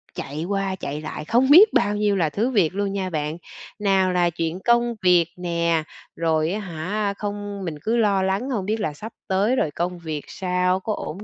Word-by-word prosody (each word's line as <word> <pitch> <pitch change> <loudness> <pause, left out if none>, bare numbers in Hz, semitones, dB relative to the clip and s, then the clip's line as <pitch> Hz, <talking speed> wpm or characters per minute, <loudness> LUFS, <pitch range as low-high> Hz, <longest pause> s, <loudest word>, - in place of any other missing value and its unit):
chạy 150 +3 -5
qua, 195 0 -1
chạy 150 -4 -5
lại 155 - -6
không 240 - +2
biết 385 +9 +8
bao 205 +1 +2
nhiêu 205 -1 +1
là 170 -5 +1
thứ 215 - 0
việc 185 -7 +2
luôn 200 0 -1
nha 190 -2 -2
bạn, 155 -1 -3 0.4
nào 195 -2 +2
là 175 -1 +3
chuyện 165 +1 -3
công 235 +2 +2
việc 175 -2 +5
nè, 170 -2 0 0.3
rồi, 160 -1 +1
á 205 - -2
hả, 200 +3 -3
không 205 -1 -5
mình 165 -3 -4
cứ 225 +7 0
lo 200 -4 +2
lắng 195 +7 -1
hông 215 -8 -2
biết 215 +3 -1
là 195 -8 -2
sắp 215 +10 -9
tới 200 +5 +2
rồi 155 - 0
công 175 +3 -3
việc 155 -3 -4
sao, 180 0 0
có 215 +3 -3
ổn 195 0 -6
190 Hz, 210 wpm, -23 LUFS, 170-210 Hz, 0.4 s, biết